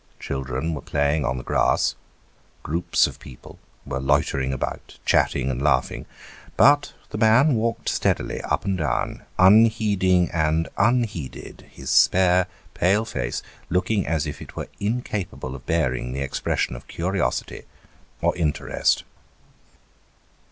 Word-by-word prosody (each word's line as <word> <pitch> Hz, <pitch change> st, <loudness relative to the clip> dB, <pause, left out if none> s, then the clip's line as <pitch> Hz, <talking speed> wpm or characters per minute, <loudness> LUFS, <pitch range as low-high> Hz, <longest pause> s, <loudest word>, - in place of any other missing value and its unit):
Children 65 Hz, +4 st, -3 dB
were 75 Hz, -, -5 dB
playing 70 Hz, 0 st, 0 dB
on 65 Hz, +1 st, -1 dB
the 65 Hz, -, -6 dB
grass; -, -, +2 dB, 0.7 s
groups 85 Hz, +4 st, +1 dB
of -, -, -6 dB
people 65 Hz, -3 st, -13 dB, 0.3 s
were 70 Hz, 0 st, -3 dB
loitering 65 Hz, -1 st, +1 dB
about, 65 Hz, -, -5 dB
chatting 65 Hz, -1 st, +2 dB
and 65 Hz, 0 st, -4 dB
laughing; 75 Hz, -1 st, 0 dB, 0.5 s
but 145 Hz, +1 st, +5 dB, 0.2 s
the -, -, -4 dB
man 120 Hz, +7 st, +5 dB
walked 115 Hz, -1 st, -1 dB
steadily -, -, 0 dB
up -, -, -2 dB
and 95 Hz, -2 st, -1 dB
down, 75 Hz, -4 st, -1 dB, 0.2 s
unheeding 100 Hz, -3 st, +4 dB
and 80 Hz, 0 st, +1 dB
unheeded, 115 Hz, -, -1 dB
his -, -, -6 dB
spare 90 Hz, -1 st, +4 dB, 0.3 s
pale 100 Hz, +5 st, +2 dB
face 115 Hz, -, -3 dB, 0.3 s
looking 95 Hz, +2 st, 0 dB
as 80 Hz, -3 st, 0 dB
if -, -, -6 dB
it -, -, -11 dB
were -, -, -5 dB
incapable 105 Hz, -, -3 dB
of 70 Hz, 0 st, -11 dB
bearing 65 Hz, -7 st, 0 dB
the 70 Hz, -, -3 dB
expression 70 Hz, -2 st, -1 dB
of -, -, -11 dB
curiosity 85 Hz, -7 st, -2 dB, 0.6 s
or -, -, +2 dB
interest. 80 Hz, -4 st, 0 dB
85 Hz, 130 wpm, -23 LUFS, 70-100 Hz, 0.7 s, but